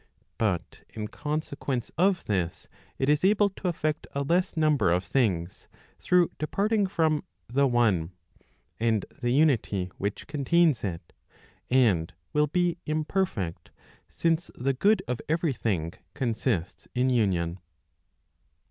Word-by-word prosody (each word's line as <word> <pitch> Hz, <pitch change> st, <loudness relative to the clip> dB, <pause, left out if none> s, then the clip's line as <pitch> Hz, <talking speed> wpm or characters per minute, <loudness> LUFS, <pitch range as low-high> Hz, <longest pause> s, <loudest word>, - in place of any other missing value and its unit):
But 100 Hz, -7 st, -1 dB
in 105 Hz, -1 st, -6 dB
consequence 145 Hz, -4 st, -3 dB
of 185 Hz, 0 st, +2 dB
this 90 Hz, -5 st, -2 dB, 0.3 s
it 135 Hz, -, 0 dB
is 150 Hz, +2 st, +3 dB
able 205 Hz, +1 st, +4 dB
to 190 Hz, -, -5 dB
effect 155 Hz, -3 st, -1 dB
a 140 Hz, -, 0 dB
less 175 Hz, +4 st, +1 dB
number 155 Hz, -, +3 dB
of 90 Hz, +2 st, +2 dB
things, 90 Hz, -5 st, -1 dB, 0.3 s
through 180 Hz, -1 st, +3 dB
departing 200 Hz, +6 st, +1 dB
from 160 Hz, -4 st, +1 dB, 0.2 s
the 140 Hz, +3 st, +2 dB
one, 110 Hz, -10 st, +2 dB, 0.7 s
and 110 Hz, -3 st, +1 dB, 0.2 s
the 120 Hz, -, 0 dB
unity 120 Hz, -, +2 dB
which 100 Hz, +1 st, -3 dB
contains 150 Hz, 0 st, +2 dB
it, 85 Hz, -4 st, -5 dB, 0.6 s
and 105 Hz, -12 st, +3 dB, 0.2 s
will 150 Hz, 0 st, +3 dB
be 175 Hz, +2 st, 0 dB
imperfect, 155 Hz, -, -2 dB, 0.4 s
since 165 Hz, 0 st, 0 dB
the 135 Hz, +2 st, 0 dB
good 195 Hz, +8 st, +3 dB
of 125 Hz, -1 st, -2 dB
every 160 Hz, -2 st, +1 dB
thing 90 Hz, -8 st, -2 dB, 0.2 s
consists 115 Hz, -, -2 dB
in 130 Hz, +1 st, +2 dB
union. 95 Hz, -7 st, +1 dB
135 Hz, 125 wpm, -27 LUFS, 105-160 Hz, 0.7 s, able